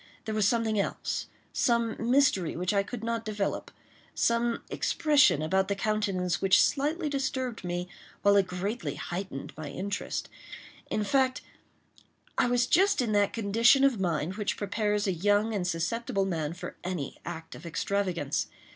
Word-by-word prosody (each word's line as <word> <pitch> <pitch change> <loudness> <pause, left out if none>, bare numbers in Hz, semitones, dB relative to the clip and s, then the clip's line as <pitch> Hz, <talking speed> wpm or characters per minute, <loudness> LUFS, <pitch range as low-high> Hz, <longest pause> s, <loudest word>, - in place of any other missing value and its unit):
There 220 - -3
was 215 -2 +3
something 225 -2 +1
else—some 235 +3 -1
mystery 235 - +2
which 180 +3 0
I 200 - +3
could 215 +3 -7
not 230 0 -1
develope—some 230 +2 -2
expression 295 - +3
about 190 +4 +1
the 200 - 0
countenance 195 -4 0
which 190 -1 +5
slightly 300 +4 +1
disturbed 260 -5 -2
me 175 0 -3 0.4
while 200 0 +5
it 195 -2 +4
greatly 180 - -3
heightened 175 -5 -5
my 155 -1 -6
interest. 200 +7 -3 0.6
In 215 - 0
fact, 260 +4 +2 0.9
I - - +3
was 245 0 +2
just 390 +9 +3
in 240 -4 +1
that 205 -1 +3
condition 230 +5 +4
of 270 -6 +3
mind 175 0 -1
which 210 -2 -1
prepares 210 +1 0
a 190 - +1
young 205 +5 +2
and 185 -4 -1
susceptible 195 +5 -1
man 160 -4 -2
for 180 - -8
any 175 -7 -4
act 160 -1 -7
of - - -11
extravagance. 175 -3 -1
205 Hz, 145 wpm, -29 LUFS, 180-235 Hz, 0.9 s, which